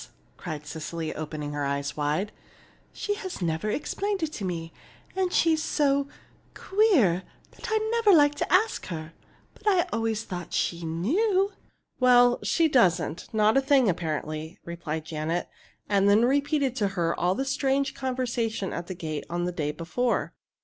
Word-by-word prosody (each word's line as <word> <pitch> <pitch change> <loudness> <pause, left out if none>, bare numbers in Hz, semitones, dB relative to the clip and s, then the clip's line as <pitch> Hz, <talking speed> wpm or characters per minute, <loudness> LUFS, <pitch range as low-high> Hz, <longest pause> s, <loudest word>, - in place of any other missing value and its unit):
cried 155 -4 -6
Cecily, 160 +1 -5
opening 150 -1 -5
her 145 0 -2
eyes 140 0 -2
wide. 150 +7 -1 0.6
"She 410 - -2
has 385 -3 -6
never 170 +3 -1
explained 390 - -2
it 310 -1 -2
to 205 - -5
me, 165 -3 -4 0.4
and 375 -1 0
she's 320 -3 +3
so 280 -2 +1 0.5
queer 345 - +3 0.3
that - - -8
I 440 - +3
never 460 -3 +4
liked 290 -4 +5
to - - -2
ask 420 +5 +2
her. 160 -2 -6 0.4
But 425 - -12
I 375 -4 +4
always 225 -1 -1
thought 180 -4 -7
she 170 0 -1
knew!" 370 - +1 0.5
"Well, 245 -1 +5
she 330 -1 +2
doesn't 180 - +2
not 215 +2 +3
a - - +5
thing, 270 -3 +4
apparently," 155 -2 -3
replied 160 -2 -5
Janet, 160 +2 -2 0.4
and 200 -1 +3
then 215 +3 +5
repeated 280 0 +1
to 205 - +2
her 170 -1 +1
all 180 +2 +2
the 270 - -1
strange 270 0 0
conversation 240 -6 -2
at 170 0 -5
the 185 - -5
gate 155 -3 -5
on 175 +1 -1
the 180 - -1
day 155 -4 -2
before. 175 +11 -1
210 Hz, 160 wpm, -27 LUFS, -, 0.6 s, liked